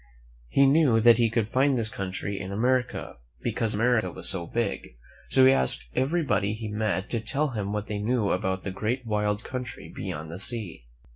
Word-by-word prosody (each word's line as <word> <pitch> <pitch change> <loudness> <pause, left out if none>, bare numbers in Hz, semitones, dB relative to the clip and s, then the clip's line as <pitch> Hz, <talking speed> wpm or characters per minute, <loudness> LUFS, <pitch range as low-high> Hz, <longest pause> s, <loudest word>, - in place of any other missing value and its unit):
He 140 - +4
knew 135 -5 +4
that 115 0 +6
he 115 -1 +3
could 115 -1 0
find 130 +3 +2
this 115 -2 +1
country 95 0 -4
in 95 0 -6
America, 125 - -1 0.3
because 115 -3 0
America 115 +1 +2
was - - -4
so 85 -3 -1
big; 115 - -3 0.3
so 130 - +5
he 130 - +8
asked 65 - 0
everybody 135 - +1
he 110 0 -5
met 105 -2 -1
to 115 - 0
tell 145 +7 -1
him 105 -5 -3
what 105 0 -2
they 105 -1 -4
knew 110 -1 0
about 95 +1 -1
the 100 - -4
great 120 +6 -2
wild 105 -1 -1
country 125 -3 -6
beyond 80 +1 -5
the 85 - -5
sea. 105 - 0
110 Hz, 190 wpm, -26 LUFS, 100-125 Hz, 0.3 s, he